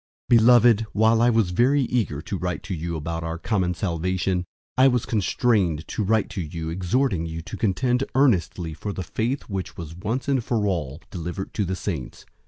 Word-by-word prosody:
001:003 120 - +8
Beloved, 120 -1 +6
while 110 +2 +4
I 120 - +5
was 110 -6 +2
very 130 +9 +3
eager 110 - -1
to 100 - -4
write 90 -3 -3
to 100 - -4
you 85 0 -3
about 80 +1 -4
our 80 0 -3
common 90 -2 0
salvation, 90 +1 -1 0.3
I 130 +1 +6
was 125 -3 +1
constrained 100 -6 +1
to 110 - -2
write 110 +1 +2
to 95 - -3
you 80 0 -5
exhorting 90 +1 0
you 80 0 -6
to - - -7
contend 125 +5 +1
earnestly 90 - +2
for 100 +7 -5
the 95 - -4
faith 115 - -2
which 95 -3 -5
was 80 -2 -7
once 110 +9 -3 0.2
for 110 -3 0
all 80 -6 -2
delivered 90 +2 -5
to 105 - 0
the 95 +1 -2
saints. 85 -9 -5
95 Hz, 190 wpm, -24 LUFS, 85-115 Hz, 0.3 s, 001:003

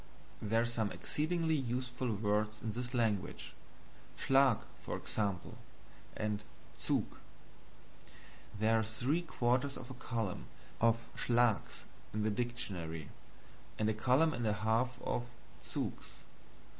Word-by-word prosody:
There 115 +2 +2
are - - +2
some 115 -3 0
exceedingly 160 +1 0
useful 125 -2 -1
words 105 +1 +1
in 110 -1 -2
this 125 +3 -3
language. 110 -5 0 0.6
SCHLAG, 135 -3 +5 0.3
for - - -2
example; 100 -4 -2 0.6
and 105 -1 -1 0.4
ZUG. - - +2 1.5
There 110 +1 +4
are - - +1
three 125 +9 +1
quarters 130 -3 +1
of 130 +1 -8
a - - -4
column 115 -6 -3 0.3
of 115 0 +5 0.2
SCHLAGS 120 -3 +2 0.3
in 105 - +1
the 110 - +2
dictonary, 95 -10 -3 0.7
and 110 - +1
a - - +2
column 130 +8 +4
and 120 -3 -1
a 105 - +3
half 115 +4 +1
of 120 - -1 0.3
ZUGS. - - -3
115 Hz, 120 wpm, -35 LUFS, 110-125 Hz, 1.5 s, SCHLAG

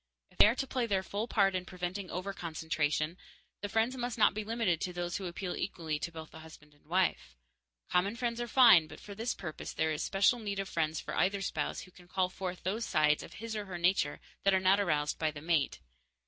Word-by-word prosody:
If - - -24
they - - +10
are 225 - +2
to 270 - -1
play 255 -2 -1
their 195 -3 +1
full 205 +4 -3
part 195 -5 +3
in 185 -1 -1
preventing 180 +1 -5
overconcentration, 160 -3 -2 0.4
the 205 - -3
friends 225 +5 +1
must 245 -1 -3
not 220 - +5
be 215 - -3
limited 215 -7 0
to 180 - -2
those 175 0 -2
who 190 - -4
appeal 175 +1 -4
equally 160 -5 -3
to 170 - -4
both 160 -1 -9
the 160 - -11
husband 155 -2 -14
and 145 - -28
the - - -30
wife. 175 - 0 0.5
Common 195 +5 +1
friends 235 -1 -2
are 240 - -2
fine, 230 -10 +7
but - - -11
for 205 - -9
this 225 +4 -2
purpose 155 -5 -6
there 160 - +1
is 150 - -2
special 200 +5 +3
need 205 -3 -3
of 195 0 -2
friends 160 -2 -1
for - - -6
either 195 +2 +1
spouse - - -2
who 185 - -13
can 180 0 -17
call 185 0 0
forth 185 -1 -5
those 210 +6 -1
sides 150 -1 +3
of - - -10
his 225 +1 -6
or 210 -1 -3
her 185 -3 -6
nature 170 -4 +1 0.2
that 195 -1 +4
are - - +4
not 190 +2 +4
aroused 150 -6 0
by 155 - +2
the 150 -1 -7
mate. 155 - 0
185 Hz, 235 wpm, -32 LUFS, 160-205 Hz, 0.5 s, they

